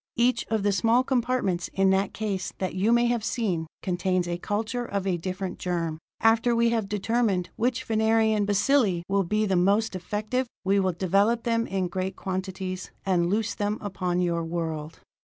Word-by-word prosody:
Each 240 +1 +2
of 220 -3 0
the 205 - +3
small 230 +5 +3
compartments 245 -9 0
in 195 0 +4
that 190 +1 +1
case 200 -4 -3
that 185 -2 -2
you 195 +5 +1
may 235 0 +4
have 240 -2 0
seen, 185 -9 -1 0.2
contains 180 -1 0
a 175 0 -3
culture 225 +6 -2
of 200 -4 -3
a 190 -2 +1
different 185 +2 -4
germ. 165 -3 -2 0.2
After 225 +1 +4
we 235 0 +3
have 225 -4 -1
determined 210 -3 0
which 245 +2 0
Venerian 220 -2 +2
bacilli 205 -3 +2
will 195 0 +2
be 215 +4 +1
the 195 -2 +1
most 200 +4 +2
effective, 215 +7 -2 0.2
we 200 +1 +3
will 190 -2 +1
develop 200 +6 +2
them 230 0 0
in 190 -2 -1
great 185 +2 -3
quantities, 185 0 -4 0.2
and 175 -3 +2
loose 215 +3 0
them 205 +1 -1
upon 180 -3 -2
your 170 -1 0
world. 165 -2 -4
200 Hz, 175 wpm, -26 LUFS, 185-225 Hz, 0.2 s, in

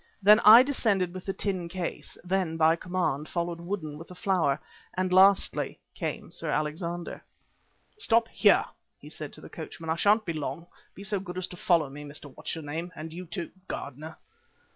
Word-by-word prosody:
Then 210 +2 +8
I 225 +3 +10
descended 205 -10 +1
with 185 +1 -8
the 195 - 0
tin 185 -5 -2
case; 180 0 -5
then, 180 -3 0
by 160 0 +5
command, 170 -5 -2
followed 170 -1 -2
Woodden 170 -5 -4
with 165 - -10
the 180 - -11
flower, 175 -7 +1 0.4
and 185 0 0
lastly 190 +1 +4 0.2
came - - -4
Sir - - -5
Alexander. 170 +3 -3 0.8
"Stop 230 - +3
here," - - +4 0.3
he - - -13
said - - -7
to - - -7
the - - -10
coachman; 160 -1 -6
"I - - +2
shan't 210 +5 +3
be 170 - -2
long. 155 +1 -4 0.3
Be 195 - -9
so 200 0 -1
good 180 -1 -7
as 185 - -1
to - - -9
follow 175 -5 +2
me, 145 +2 -9
Mr. 145 -1 -9
What's - - -4
your 160 - -7
name, 165 +4 -4
and 160 +1 -7
you, 180 +1 -7
too, 170 +1 -5 0.2
Gardener." 155 +4 -6
175 Hz, 185 wpm, -28 LUFS, 160-190 Hz, 0.8 s, I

